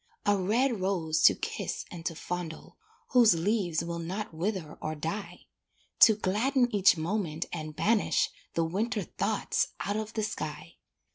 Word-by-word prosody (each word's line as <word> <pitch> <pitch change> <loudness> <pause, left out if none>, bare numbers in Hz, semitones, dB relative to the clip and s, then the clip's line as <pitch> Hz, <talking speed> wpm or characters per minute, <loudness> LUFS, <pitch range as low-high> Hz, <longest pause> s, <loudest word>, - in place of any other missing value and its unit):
A 205 - +4
red 220 +5 +1
rose 170 -5 0
to - - +8
kiss - - -4
and 170 -2 -8
to 165 - -3
fondle, 170 -1 -6 0.3
Whose 235 -7 +6
leaves 175 -2 0
will 170 0 -4
not 190 +4 -4
wither 170 -2 -3
or 155 0 -3
die 165 +7 -5 0.5
To 220 - +8
gladden 240 +6 +1
each 195 -3 +5
moment 165 -1 -2
and 155 -2 -5
banish 220 +4 +2 0.2
The 165 - +2
winter 210 +6 -1
thoughts 200 +5 -1
out 205 +1 -2
of 220 0 -4
the 220 - 0
sky. 215 - -5
195 Hz, 150 wpm, -29 LUFS, 165-215 Hz, 0.5 s, to